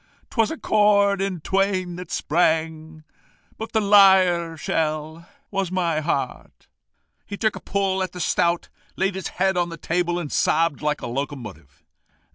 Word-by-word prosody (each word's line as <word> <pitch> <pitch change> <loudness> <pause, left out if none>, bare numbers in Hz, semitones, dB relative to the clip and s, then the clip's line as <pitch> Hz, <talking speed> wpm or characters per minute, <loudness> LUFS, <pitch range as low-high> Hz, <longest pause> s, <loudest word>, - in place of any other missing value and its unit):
'Twas 225 -3 +2
a 320 - -5
chord 200 -3 +3
in 195 -3 -2
twain 190 -1 0
that 180 -1 -8
sprang 160 -1 -1 0.6
But 220 - -6
the 220 - +2
lyre 190 -5 +5
shell 155 +2 -3 0.2
was 195 -3 -2
my 170 -4 0
heart.' 155 +2 -4 0.6
He 200 - -7
took 220 0 0
a - - -6
pull 195 -1 -1
at 185 -2 -2
the 180 - -9
stout, 170 0 0 0.3
laid 195 +1 0
his 190 -1 -4
head 190 0 +1
on 175 -1 0
the 165 - -8
table, 175 +2 -1
and 170 -5 -5
sobbed 165 -2 +1
like 150 0 -1
a - - -3
locomotive." 115 - -6
175 Hz, 155 wpm, -23 LUFS, 160-195 Hz, 0.6 s, lyre